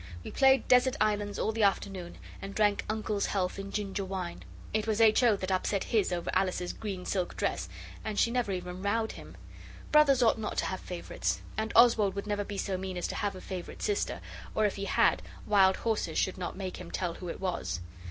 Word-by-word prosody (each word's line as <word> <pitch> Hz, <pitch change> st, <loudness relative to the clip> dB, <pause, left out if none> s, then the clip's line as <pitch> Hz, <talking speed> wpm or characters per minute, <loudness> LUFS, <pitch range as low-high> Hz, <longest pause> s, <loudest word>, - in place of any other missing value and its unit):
We -, -, -7 dB
played 265 Hz, -2 st, +4 dB
desert 250 Hz, 0 st, +5 dB
islands 205 Hz, -1 st, +1 dB
all 220 Hz, -, 0 dB
the 220 Hz, 0 st, -2 dB
afternoon 195 Hz, -3 st, 0 dB, 0.2 s
and 195 Hz, 0 st, -7 dB
drank 210 Hz, -1 st, +2 dB
Uncle's 215 Hz, -1 st, -1 dB
health 185 Hz, -1 st, -1 dB
in 195 Hz, 0 st, -6 dB
ginger 200 Hz, -1 st, -2 dB
wine. 185 Hz, -2 st, -5 dB, 0.3 s
It 215 Hz, 0 st, 0 dB
was 220 Hz, 0 st, +1 dB
H. 220 Hz, 0 st, +6 dB
O. 235 Hz, -4 st, +5 dB
that 190 Hz, -1 st, -3 dB
upset 190 Hz, +1 st, 0 dB
his 210 Hz, -5 st, +1 dB
over 175 Hz, -1 st, -2 dB
Alice's 185 Hz, -1 st, 0 dB
green 195 Hz, -4 st, -5 dB
silk 185 Hz, -3 st, -2 dB
dress, -, -, -1 dB, 0.3 s
and 215 Hz, -2 st, -4 dB
she 235 Hz, -, +3 dB
never 245 Hz, -4 st, 0 dB
even 180 Hz, 0 st, -4 dB
rowed 220 Hz, +3 st, 0 dB
him. -, -, -11 dB, 0.5 s
Brothers 280 Hz, -4 st, +6 dB
ought 225 Hz, -1 st, +3 dB
not 215 Hz, -, -4 dB
to -, -, +1 dB
have 185 Hz, -, -3 dB
favourites, 180 Hz, -1 st, -3 dB
and 220 Hz, +1 st, -2 dB
Oswald 225 Hz, -5 st, +6 dB
would 200 Hz, -, -3 dB
never 205 Hz, -1 st, -1 dB
be 205 Hz, 0 st, -6 dB
so 190 Hz, -1 st, -2 dB
mean 185 Hz, -1 st, -4 dB
as 175 Hz, -, -1 dB
to -, -, -4 dB
have 205 Hz, -2 st, -1 dB
a 185 Hz, -, -8 dB
favourite 185 Hz, -2 st, -6 dB
sister, 415 Hz, -1 st, -1 dB, 0.3 s
or, 215 Hz, -, +3 dB
if 205 Hz, -, 0 dB
he 200 Hz, -, -4 dB
had, -, -, +3 dB, 0.2 s
wild 190 Hz, -2 st, +5 dB
horses 215 Hz, -8 st, -1 dB
should 190 Hz, 0 st, 0 dB
not 180 Hz, +1 st, -4 dB
make 190 Hz, -2 st, -4 dB
him -, -, -9 dB
tell 175 Hz, -2 st, -2 dB
who 180 Hz, +1 st, -7 dB
it -, -, -5 dB
was. 130 Hz, -, -2 dB
200 Hz, 215 wpm, -30 LUFS, 185-220 Hz, 0.5 s, H